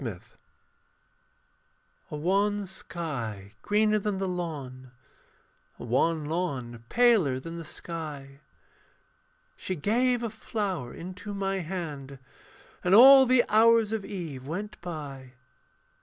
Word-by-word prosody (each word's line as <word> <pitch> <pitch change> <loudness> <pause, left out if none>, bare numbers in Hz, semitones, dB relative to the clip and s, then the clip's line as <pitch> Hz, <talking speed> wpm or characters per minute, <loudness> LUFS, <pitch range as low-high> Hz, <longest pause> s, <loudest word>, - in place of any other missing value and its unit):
VANITY 105 -8 -6 1.8
A - - -5
wan 200 +6 +1
sky 135 - -5
greener 215 +1 +2
than 205 -1 -2
the 190 0 -2
lawn, 145 -8 -5 0.9
A - - -9
wan 150 +6 +1
lawn 135 -8 -3
paler 215 - +3
than 165 +5 -8
the - - -6
sky. 150 -4 -7 1.1
She 185 - -4
gave 240 - +1
a 230 - -3
flower 200 - -4
into 185 +4 -8
my 195 0 -1
hand, 155 -6 -6 0.7
And 180 +2 +4
all 265 +3 +9
the 250 -1 +4
hours 225 0 +5
of 220 -2 -2
eve 160 -11 -6
went 205 +6 -5
by. 140 -7 -7
175 Hz, 110 wpm, -28 LUFS, 140-210 Hz, 1.8 s, all